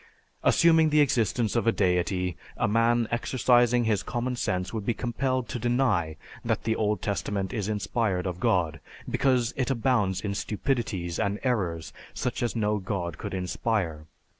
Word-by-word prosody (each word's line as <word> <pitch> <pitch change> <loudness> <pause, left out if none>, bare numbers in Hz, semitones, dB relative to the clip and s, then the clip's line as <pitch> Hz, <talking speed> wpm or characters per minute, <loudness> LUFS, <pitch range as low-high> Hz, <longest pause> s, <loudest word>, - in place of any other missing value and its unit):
Assuming 160 -2 +5
the 150 0 +3
existence 120 -5 +2
of 115 -1 +1
a - - +6
deity, 90 -2 0 0.2
a - - +1
man 115 +2 +2
exercising 120 0 +3
his 110 -3 +1
common 125 +1 -2
sense 90 -5 -2
would 110 -2 -3
be 115 +2 -1
compelled 130 +1 -1
to 120 - -3
deny 115 - +1 0.3
that - - -1
the 110 0 0
Old 105 -1 0
Testament 100 -1 -2
is 105 -3 -2
inspired 105 -3 -1
of 90 -1 -3
God, 85 -4 +1 0.3
because 125 -3 +1
it 130 -1 -1
abounds 115 -7 +1
in 100 -1 -2
stupidities 100 -6 -2
and 100 -1 0
errors 95 -11 -1 0.2
such - - -2
as 120 - -1
no 105 -2 +1
god 90 -5 -4
could - - -5
inspire. 90 -4 -2
110 Hz, 160 wpm, -27 LUFS, 95-120 Hz, 0.3 s, a